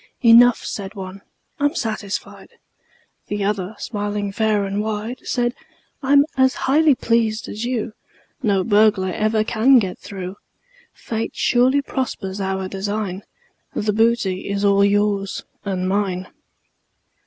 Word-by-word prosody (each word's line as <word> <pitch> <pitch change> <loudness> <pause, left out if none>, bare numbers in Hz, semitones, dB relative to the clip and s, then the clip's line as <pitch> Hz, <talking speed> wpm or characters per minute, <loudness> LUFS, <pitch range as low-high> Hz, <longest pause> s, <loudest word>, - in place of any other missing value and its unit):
"Enough," 235 +1 +6
said 195 0 -5
one: 190 0 -8 0.4
"I'm 290 +3 +1
satisfied." 215 - -4 0.8
The 205 -1 -2
other, 200 0 -2
smiling 205 -2 -3
fair 210 -1 +1
and 200 +1 -2
wide, 220 +3 -4
Said: 240 -1 -1 0.5
"I'm 280 +1 +5
as 260 -1 +3
highly 295 +1 +4
pleased 225 -2 0
as 215 +3 -5
you: 240 -3 -2 0.5
No 200 -6 +2
burglar 205 -2 +3
ever 215 +3 +1
can 235 +4 +4
get 190 -6 -1
through. 190 -1 -7 0.5
Fate 225 0 -5
surely 260 +3 +3
prospers 200 -8 -4
our 190 0 -2
design 200 0 -3 0.5
The 210 0 0
booty 215 -4 +1
all 200 0 +4
is 200 - +5
yours 205 -1 0 0.2
and 185 -2 -2
mine." 190 -2 -1
210 Hz, 125 wpm, -21 LUFS, 195-235 Hz, 0.8 s, Enough